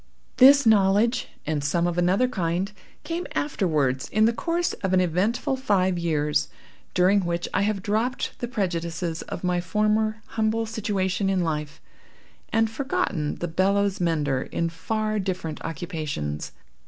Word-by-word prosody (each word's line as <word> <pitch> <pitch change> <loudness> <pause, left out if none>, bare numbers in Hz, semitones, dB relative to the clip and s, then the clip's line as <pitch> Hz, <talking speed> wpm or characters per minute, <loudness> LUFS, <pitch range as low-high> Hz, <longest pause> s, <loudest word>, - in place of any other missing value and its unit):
This 275 +1 +8
knowledge, 210 +2 +3 0.2
and 150 -2 -1
some 170 +4 +1
of 175 -1 0
another 185 +8 +3
kind, 185 -3 -1 0.3
came 340 +1 -3
afterwards 150 - 0
in 215 +1 +3
the 230 - +3
course 340 +7 -1
of 190 -1 0
an 185 - +5
eventful 185 +9 0
five 190 -8 +1
years, 150 -3 0 0.5
during 185 +3 +4
which 170 0 -2
I - - +2
have 200 -1 0
dropped 220 +5 -1
the 240 - -3
prejudices 170 -6 -2
of - - -7
my 180 -1 +1
former 215 +4 0
humble 220 0 0
situation 200 -3 -1
in 190 -2 +1
life, 150 -3 -3 0.7
and 225 0 +3
forgotten 220 - -2
the 175 - -4
bellows 195 +3 +1
mender 150 -6 +1
in 170 0 -2
far 215 +5 -2
different 185 -5 -3
occupations. 155 - -4
190 Hz, 140 wpm, -25 LUFS, 165-215 Hz, 0.7 s, This